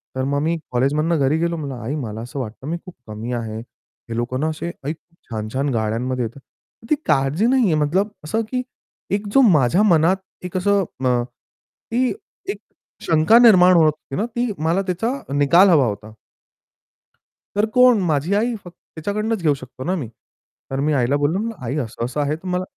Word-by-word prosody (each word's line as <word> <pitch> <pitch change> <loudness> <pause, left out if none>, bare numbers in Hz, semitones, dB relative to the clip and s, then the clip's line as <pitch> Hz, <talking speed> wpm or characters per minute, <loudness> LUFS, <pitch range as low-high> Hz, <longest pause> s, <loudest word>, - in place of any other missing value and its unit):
तर 130 - -1
मग 140 +1 0
मी 165 +2 0
कॉलेजमधनं 150 +6 +1
घरी 140 +3 +2
गेलो, 170 0 0
म्हणलं, 140 -4 -5
"आई 130 +7 -3
मला 110 -7 -5
असं 120 +4 -6
वाटतं, 125 +2 -6
मी 165 +2 -2
खूप 180 - -11
कमी 110 +3 -6
आहे. 115 -2 -4
हे 115 0 -12
लोक 120 +1 -2
ना 155 - 0
असे 155 +2 -5 0.2
आई 150 - -1
खूप 170 +1 -25
छान-छान 115 +5 -2
गाड्यांमध्ये 115 +3 -1
येतात." 115 +5 -8 0.5
ती 305 - +4
काळजी 150 +6 +2
नाही 260 0 +3
आहे, 180 - +2
मतलब 185 +8 +1
असं, 220 +9 -1
की 250 -1 0 0.5
एक 205 +1 -4
जो 275 - +6
माझ्या 155 +5 +3
मनात 175 -2 +4 0.3
एक 180 0 -3
असं 200 +1 +2 0.2
अ, 125 -1 +2 0.5
की 250 +2 -2 0.4
एक 400 - -4 0.4
शंका 160 +8 +5
निर्माण 185 -7 +7
होत 165 - +6
होती 150 -2 -3
ना 215 - 0
ती 240 0 0
मला 170 +4 +2
त्याचा 195 +6 -1 0.2
निकाल 155 +7 +5
हवा 150 -7 +5
होता. 105 0 -5 1.4
तर 205 +1 +3
कोण? 250 -3 +6
माझी 155 +4 0
आई 235 +4 +1
फक्त. 175 -1 -12 0.2
तिच्याकडूनच 210 +5 -2
घेऊ 155 -3 +3
शकतो 130 -1 -9
ना 185 +5 0
मी. 145 -10 -4 0.6
तर 135 - -2
मी 150 +2 +1
आईला 135 0 +2
बोललो, 145 +5 +1
म्हणलं 225 +1 -3
"आई 130 +6 -2
असं-असं 125 +1 -3
आहे, 145 +1 0
तु 165 +4 -10
मला" 180 0 -1
155 Hz, 185 wpm, -21 LUFS, 130-185 Hz, 1.4 s, निर्माण